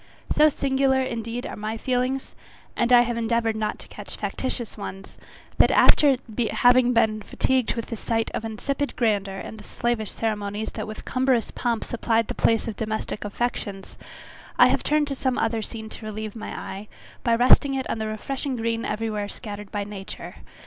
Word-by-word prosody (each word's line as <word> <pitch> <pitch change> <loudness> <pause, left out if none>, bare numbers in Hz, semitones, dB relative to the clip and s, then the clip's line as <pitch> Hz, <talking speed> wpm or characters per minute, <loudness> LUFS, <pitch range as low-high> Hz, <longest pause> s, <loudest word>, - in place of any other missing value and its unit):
So 305 +1 +6
singular, 265 -1 +2
indeed, 235 -1 -4
are - - -5
my 215 +2 -4
feelings, 255 +2 -1 0.4
and 235 +1 +1
I 245 -1 +9
have 240 -1 -1
endeavoured 230 -1 +1
not 215 -1 -1
to - - -11
catch - - -8
factitious 250 -3 -3
ones, 195 -2 -8 0.4
that - - +7
after 280 -3 +6 0.3
having 245 0 +5
been 220 -2 +2
fatigued 260 +3 +1
with 230 - -3
the 230 - -5
sight 225 +1 -1
of - - -2
insipid 275 +6 -2
grandeur 200 -5 +1
and 220 - -7
the - - -11
slavish 235 -4 -1
ceremonies 210 -1 -2
that - - -5
with 215 - -8
cumberous 255 -3 +1
pomp 235 -2 -1
supplied 230 -1 0
the - - -1
place 225 0 +2
of 225 - -3
domestic 220 0 -3
affections, 205 -2 -3 0.6
I - - +8
have - - +2
turned 300 -1 +2
to - - -1
some 260 -1 -1
other 225 0 +1
scene 220 0 -6
to 220 - -9
relieve 215 0 -5
my 220 - -6
eye, 195 +2 -6 0.4
by 235 -1 +3
resting 255 +3 +5
it 265 - -2
on - - -2
the 220 - -2
refreshing 260 +5 -3
green 230 0 -1
every 225 +1 -2
where 205 -1 -3
scattered 205 -3 -7
by 205 -1 -1
nature. 200 0 -8
230 Hz, 185 wpm, -25 LUFS, 215-250 Hz, 0.6 s, I